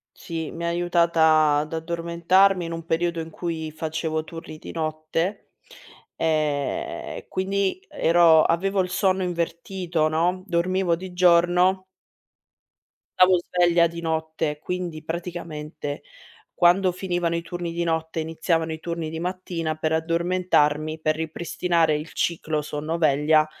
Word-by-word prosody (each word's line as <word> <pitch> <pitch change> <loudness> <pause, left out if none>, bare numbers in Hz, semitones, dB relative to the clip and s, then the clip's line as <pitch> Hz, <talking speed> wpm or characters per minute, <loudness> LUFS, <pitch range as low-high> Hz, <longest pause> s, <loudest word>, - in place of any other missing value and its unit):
Sì, 165 -2 -5
mi 170 +1 -6
ha 170 - 0
aiutata 165 -3 +3
ad 150 +2 -3
addormentarmi 170 +3 +2
in 165 - -5
un 165 0 -5
periodo 170 0 0
in 160 - -6
cui 160 -2 -4
facevo 160 0 -3
turni 165 -2 -9
di - - -9
notte, 160 +4 -3 0.6
ehm, 150 -3 -2
quindi 195 - -1
ero 170 - +5
avevo 195 +5 +1
il 180 -1 -1
sonno 190 0 +1
invertito 170 -1 -1
no, 175 +4 0
dormivo 180 0 +1
di 185 +1 -8
giorno 180 +1 +4 1.3
stavo 185 0 +6
sveglia 175 -1 +3
di 170 0 -5
notte. 160 -2 -2
Quindi 175 -3 -4
praticamente, 160 -3 -5 0.5
quando 180 +1 +4
finivano 175 -2 -1
i 170 - -3
turni 170 0 -5
di 170 0 -2
notte 160 0 -2
e - - -1
iniziavano 160 0 -1
i 160 - -6
turni 170 -1 -4
di 160 0 -5
mattina, 175 -3 -3
per 155 0 -2
addormentarmi, 160 -2 +1
per 155 0 +1
ripristinare 165 0 0
il 155 +3 -7
ciclo 155 -3 -1
sonno-veglia, 155 0 +2
170 Hz, 130 wpm, -24 LUFS, 160-175 Hz, 1.3 s, stavo